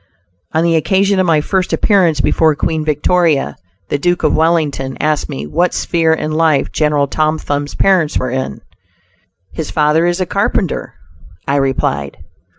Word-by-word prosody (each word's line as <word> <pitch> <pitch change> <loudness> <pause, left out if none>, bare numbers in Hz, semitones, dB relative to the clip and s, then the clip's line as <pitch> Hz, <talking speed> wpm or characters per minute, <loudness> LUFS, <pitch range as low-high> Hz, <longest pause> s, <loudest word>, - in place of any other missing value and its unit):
On 160 +1 +2
the 170 -1 +2
occasion 195 +4 +2
of 185 - +2
my 155 -2 +3
first 185 +3 -1
appearance 175 -8 +2
before 160 +1 +2
Queen 160 +1 -2
Victoria, 150 - +1 0.3
the 145 - -1
Duke 175 +3 0
of 155 - +2
Wellington 155 -5 0
asked 155 -1 0
me 70 +2 -5
what 175 - 0
sphere 165 -2 +1
in 155 -1 -1
life 155 -2 +1
General 150 -2 +1
Tom 155 +2 0
Thumb's 145 -1 -3
parents 180 -6 +2
were 130 -1 -2
in. 130 - -4 0.9
"His 160 - -5
father 155 +2 +2
is 175 +1 -1
a 185 - 0
carpenter," 195 -2 -2 0.5
I 140 - +1
replied. 95 - -1
155 Hz, 155 wpm, -15 LUFS, 145-170 Hz, 0.9 s, my